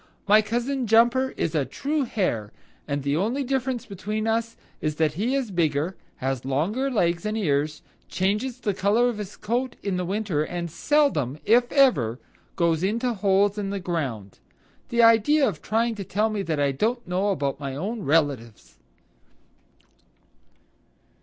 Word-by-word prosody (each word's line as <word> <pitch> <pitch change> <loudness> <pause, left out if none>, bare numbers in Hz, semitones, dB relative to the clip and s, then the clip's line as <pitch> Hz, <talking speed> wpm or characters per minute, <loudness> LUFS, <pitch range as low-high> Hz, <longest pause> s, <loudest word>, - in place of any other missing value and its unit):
My 210 +2 +6
cousin 240 +4 -2
Jumper 240 +4 +4
is 165 - -1
a 150 -3 +1
true 285 - -2
Hare, 120 - -2 0.4
and 140 -1 -2
the 140 +1 0
only 230 - 0
difference 260 -2 -2
between 210 +2 -4
us 230 +1 -1 0.2
is 155 -1 -1
that 155 -1 +1
he 225 - -1
is 260 -6 -2
bigger, 165 0 0 0.2
has 130 -1 -3
longer 175 - 0
legs 170 -8 +1
and 215 +1 -2
ears, 150 -5 0 0.3
changes 210 +7 -1
the 215 -5 -1
color 215 +6 +2
of 225 -3 -5
his 205 -1 -7
coat 240 +4 -2
in 185 -3 -1
winter, 195 -6 -1
and 170 0 -4
seldom, 245 - +1
if 240 +2 +4
ever, 185 - +3 0.4
goes 165 -2 +1
into 230 +6 0
holes 200 0 +2
in 200 -1 -3
the 200 0 -3
ground. 135 - -4 0.5
The 235 0 +3
idea 230 +6 +5
of 180 -9 -4
trying 230 +2 0
to 205 -2 -6
tell 210 +4 0
me 215 - -2
I 145 -3 +1
don't 225 - -1
know 185 +3 0
about 140 -8 -1
my 135 -2 -5
own 205 +9 -4
relatives." 140 - -1
200 Hz, 155 wpm, -25 LUFS, 155-235 Hz, 0.5 s, My